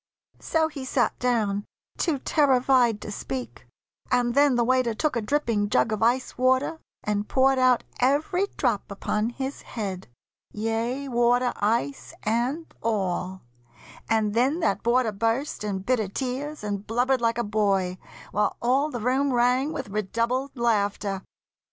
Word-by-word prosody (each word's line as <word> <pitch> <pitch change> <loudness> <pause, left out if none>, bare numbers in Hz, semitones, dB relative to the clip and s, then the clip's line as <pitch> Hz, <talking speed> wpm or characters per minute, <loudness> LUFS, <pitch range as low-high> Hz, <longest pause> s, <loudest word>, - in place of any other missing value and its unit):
So 320 -1 +1
he 295 -4 -7
sat 255 -2 0
down 215 -5 0 0.3
too 325 -5 +1
terrified 260 -5 +3
to - - -6
speak; 125 - -6 0.4
And 245 -1 +2
then 285 -1 +4
the 240 - +3
waiter 250 -2 +2
took 305 +3 0
a 235 - 0
dripping 220 -4 0
jug 125 -3 +2
Of 215 - -2
ice 245 +2 +1
water 260 +5 +2 0.2
and 210 -1 -1
poured 265 0 +3
out 255 -1 +4 0.2
every 305 +9 +2
drop - - 0
Upon 215 +2 -1
his 265 +3 -5
head, 195 -5 -5 0.5
yea, 225 +5 -2
water, 245 0 +2
ice, 230 +7 -1
and 245 +9 0 0.2
all; 190 -4 -2 0.7
And 220 -2 +2
then 260 +8 +2
that 200 - +1
boarder 235 -1 +2
burst 225 +6 -1
in 195 -3 -3
bitter 230 -2 +1
tears, 265 +6 -4
And 205 -1 -4
blubbered 245 +3 +1
like 230 0 +1
a 240 - 0
boy, 195 -4 0 0.3
while 210 +1 0
all 265 +5 +2
the 240 -6 -5
room 265 +4 +1
Rang 250 +4 +2
with 265 -7 -5
redoubled 230 +7 -1
laughter. 205 -4 0
240 Hz, 145 wpm, -25 LUFS, 210-260 Hz, 0.7 s, then